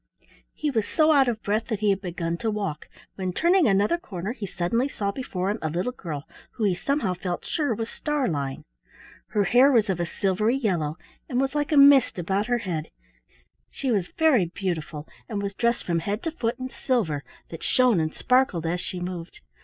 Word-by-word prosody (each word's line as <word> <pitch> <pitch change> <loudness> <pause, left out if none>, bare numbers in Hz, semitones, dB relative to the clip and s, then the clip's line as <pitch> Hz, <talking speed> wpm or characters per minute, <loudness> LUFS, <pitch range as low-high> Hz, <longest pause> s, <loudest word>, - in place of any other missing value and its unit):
He 300 -1 -1
was 220 -5 0
so 315 -1 +3
out 275 -3 +5
of 225 -2 -2
breath 215 +2 0
that 220 -4 -3
he 210 -1 +4
had 195 0 -1
begun 170 -2 -3
to 225 - -1
walk, 200 -8 -3 0.3
when 185 -2 -2
turning 345 - +4
another 205 - +3
corner 195 - -5
he 220 -5 -5
suddenly 195 +7 0
saw 200 -7 -2
before 200 -6 -2
him 215 - -3
a 155 - -1
little 180 +10 -1
girl 160 - -6 0.3
who 230 - -4
he 200 -3 +3
somehow 225 +1 0
felt 180 0 -4
sure 290 -8 0
was 225 +1 -3
Starlein. 170 - -2 0.6
Her 210 - +1
hair 250 +8 +5
was 225 -5 +3
of 180 - -3
a 175 - -1
silvery 200 +7 +1
yellow 175 - -1 0.3
and 250 - 0
was 270 +1 0
like 295 +1 -1
a 300 - +3
mist 280 -5 +7
about 195 +5 -1
her 245 0 +2
head; 165 -3 -3 0.8
she 265 -2 -2
was 195 -6 +1
very 285 - +4
beautiful 165 -4 -4 0.2
and 210 -3 -2
was 200 0 -3
dressed 235 +3 0
from 170 -2 0
head 205 +6 -3
to 325 - -1
foot 240 -6 -2
in 255 0 -5
silver 195 - -1 0.3
that 165 - -7
shone 250 -7 +3
and 155 -1 0
sparkled 250 -10 +2
as 175 +2 -1
she 180 - -5
moved. 175 -1 -6
205 Hz, 200 wpm, -25 LUFS, 175-255 Hz, 0.8 s, mist